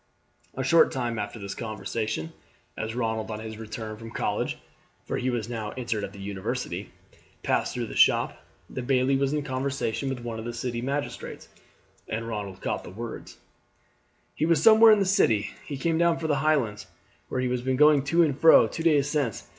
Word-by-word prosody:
A 130 - -2
short 165 +6 +5
time 120 -4 -2
after 105 +2 -4
this 100 -2 -6
conversation, 110 -5 -4 0.4
as 110 +1 -4
Ronald 110 -2 -2
on 110 -1 -4
his 110 0 -7
return 110 -1 -6
from 115 +1 -9
college - - -2 0.5
(for - - -2
he 130 - -1
was 120 -3 -2
now 110 -3 -4
entered 115 -4 -2
at 95 - -4
the 100 - -13
university) 100 -1 -4 0.5
passed - - 0
through - - -2
the - - -8
shop, - - +3 0.2
the - - -5
bailie 130 +1 +2
was 135 0 +1
in 150 -1 -1
conversation 135 -1 -2
with 130 -2 -4
one 115 -1 -5
of 110 - -7
the 120 0 -5
city 120 0 -3
magistrates, 140 +3 -4 0.6
and 115 +1 -3
Ronald 100 -4 -5
caught - - -2
the - - -9
words: 115 +5 -8 1.0
"He 155 - 0
is 160 -2 +2
somewhere 225 0 +8
in 215 - +6
the 200 - +2
city. 185 - +2 0.2
He 145 - -4
came 165 +3 0
down 170 -1 +3
from 160 -1 -3
the 145 - +2
Highlands, 135 -9 +1 0.4
where - - -2
he 130 - 0
has 125 -1 -1
been 130 +1 0
going 150 -1 +6
to 165 +4 +4
and 150 -4 +1
fro, 160 +3 +7
two - - -6
days 150 -4 +3
since. 145 -8 -2
125 Hz, 195 wpm, -26 LUFS, 110-145 Hz, 1.0 s, somewhere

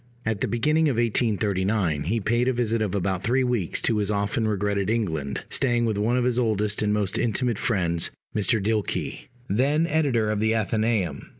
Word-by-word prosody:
At 110 -2 -1
the - - +1
beginning 150 +8 +2
of 130 - 0
1839 100 - 0
he 110 +7 0
paid 120 +4 +1
a 130 - +2
visit 115 -2 0
of 100 -2 -1
about 95 -1 -1
three 125 +4 +1
weeks 120 -9 0
to 115 - +2
his 105 -1 -1
often 105 +3 0
regretted 100 -1 0
England, 80 -12 -2
staying 120 -3 +1
with 110 -2 0
one 115 +4 +1
of 125 - +1
his 125 0 +1
oldest 105 -3 0
and 105 -1 +1
most 105 -2 -1
intimate 120 -1 0
friends, 85 -7 0 0.3
Mr. 110 +2 +1
Dilke, 105 +1 -2 0.2
then 140 +10 +2
editor 140 -9 +1
of 105 - -1
the 110 +1 +2
Athenæum. 110 -7 0
110 Hz, 185 wpm, -25 LUFS, 100-120 Hz, 0.3 s, beginning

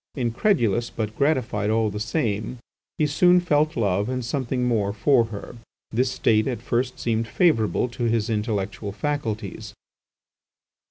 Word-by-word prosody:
Incredulous, 120 - +1
but 110 -1 -4
gratified 125 -8 0
all 110 -1 +1
the 105 - -5
same, 110 -1 -2 0.4
he 155 - +2
soon 175 +5 +4
felt 155 -3 +1
love 100 -1 +1
and 130 -2 -2
something 130 -1 -2
more 110 -5 +1
for 115 +3 +3
her. 110 +1 -8 0.3
This 125 +3 +1
state 110 -2 +2
at 125 -3 -2
first 125 +1 -1
seemed 115 -1 -1
favourable 125 - +2
to 120 0 -3
his 115 -2 +1
intellectual 105 -2 -2
faculties. 115 -2 -4
115 Hz, 140 wpm, -24 LUFS, 110-130 Hz, 0.4 s, soon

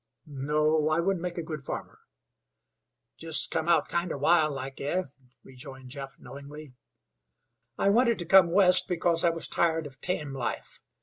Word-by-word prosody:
"No, 150 +2 0
I 155 +1 +1
wouldn't 185 0 0
make 180 0 -4
a 170 - -2
good 155 -2 -6
farmer." - - -7 1.2
"Jest 165 -1 -1
cum 160 +1 -1
out 165 -3 +3
kinder 170 -2 -2
wild 155 0 +3
like, 135 0 -7
eh?" 175 +7 -1 0.4
rejoined 130 0 -11
Jeff, 135 0 -8
knowingly. 140 0 -11 1.0
"I 195 - +2
wanted 235 +2 +3
to 175 - -3
come 175 -1 +6
West 185 -1 +4
because 170 -1 0
I 170 - +5
was 165 0 -3
tired 165 -2 +1
of 135 -3 -11
tame 150 -6 -3
life. 130 -3 -5
160 Hz, 160 wpm, -28 LUFS, 140-175 Hz, 1.2 s, come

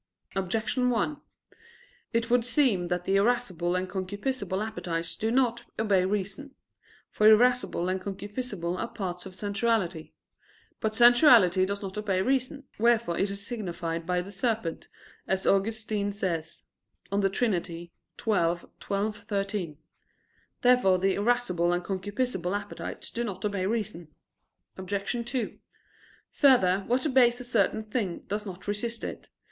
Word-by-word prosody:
Objection 220 +6 0
1: 290 +5 0 0.9
It 230 0 0
would 245 -1 +4
seem 235 -8 +2
that 180 0 -2
the 195 - +3
irascible 195 -6 +1
and 185 +1 -1
concupiscible 205 +2 -3
appetites 165 -6 -4
do 220 - -1
not 240 -1 +1
obey 205 -4 +3
reason. 205 +8 -3 0.6
For 215 - +4
irascible 240 -5 +4
and 185 0 -1
concupiscible 200 -2 -4
are 230 - -2
parts 185 -4 -5
of 185 - -11
sensuality. 200 -5 -1 0.7
But 215 0 -1
sensuality 235 - +6
does 200 +1 -3
not 195 +1 -4
obey 195 -3 0
reason, 270 +2 0 0.2
wherefore 230 -6 +3
it 195 - +1
is 200 0 -6
signified 170 -7 -4
by 180 0 +1
the 195 - -10
serpent, 210 -4 -2 0.4
as 190 0 0
Augustine 210 0 +1
says 170 -5 -3 0.5
(De 200 0 +2
Trin. 195 -3 +1
xii, 170 0 -9 0.3
12,13). 200 -1 -2 0.9
Therefore 245 -7 +5
the 190 +1 +2
irascible 200 -6 +1
and 175 0 0
concupiscible 200 0 -2
appetites 205 0 -7
do 235 - -2
not 195 -3 -4
obey 200 -2 -1
reason. 200 -7 -3 0.7
Obj. 200 +5 -2
2: 245 -4 -3 0.7
Further, 220 -10 +5
what 250 +4 +1
obeys 250 -4 +4
a - - -6
certain 220 -3 +1
thing 210 -5 -3
does 210 +1 -3
not 185 +1 -9
resist 225 +3 -3
it. - - -6
205 Hz, 130 wpm, -28 LUFS, 185-235 Hz, 0.9 s, sensuality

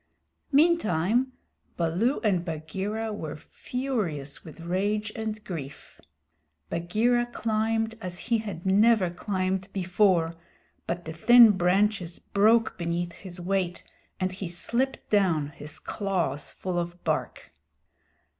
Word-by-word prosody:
Meantime, 260 - +3 0.5
Baloo 180 - +1
and 190 -6 +2
Bagheera 190 +7 -3
were 160 -7 -5
furious 180 - -4
with 160 +1 -12
rage 205 +5 -1
and 215 -1 -4
grief. 155 - -8 0.7
Bagheera 225 +8 +1
climbed 225 -1 0
as 180 -3 -5
he 230 +3 0
had 195 -6 -6
never 200 -1 +4
climbed 185 0 -2
before, 180 -3 +2 0.5
but 175 0 -3
the 160 - -5
thin 235 +6 +8
branches 190 -1 +1
broke 220 +1 +2
beneath 170 0 -1
his 180 0 -10
weight, 180 -1 -1 0.4
and 185 0 0
he 185 0 -5
slipped 235 +10 -1
down, 175 -8 +2
his 150 +1 -8
claws 175 -9 -2
full 180 -2 -3
of 175 +1 -5
bark. - - -2
190 Hz, 115 wpm, -27 LUFS, 170-220 Hz, 0.7 s, thin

